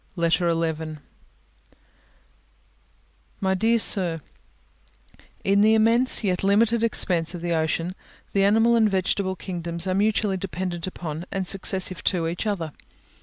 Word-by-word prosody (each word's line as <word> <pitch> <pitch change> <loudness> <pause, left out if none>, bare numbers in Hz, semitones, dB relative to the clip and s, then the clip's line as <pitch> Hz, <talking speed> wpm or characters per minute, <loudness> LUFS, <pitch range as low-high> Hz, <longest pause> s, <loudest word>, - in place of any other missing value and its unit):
LETTER 170 0 +1
XI 160 -1 -2 2.4
My 190 -1 +1
dear 225 +5 +2
Sir, 175 -7 +2 1.2
In 200 +1 +3
the 220 +1 +5
immense, 230 +3 +3
yet 185 -3 -1
limited 220 +3 +3
expanse 180 -6 0
of 170 - -8
the 170 -1 -1
ocean, 165 +2 -1 0.4
the 195 - +2
animal 225 +4 +4
and 220 -2 +4
vegetable 190 0 0
kingdoms 170 -1 -4
are 185 - 0
mutually 205 0 +1
dependent 180 -2 -4
upon, 170 -2 -6
and 190 -2 -3
successive 190 -1 -1
to 175 -4 +1
each 175 +6 -3
other. 170 -7 -2
185 Hz, 125 wpm, -24 LUFS, 170-205 Hz, 2.4 s, the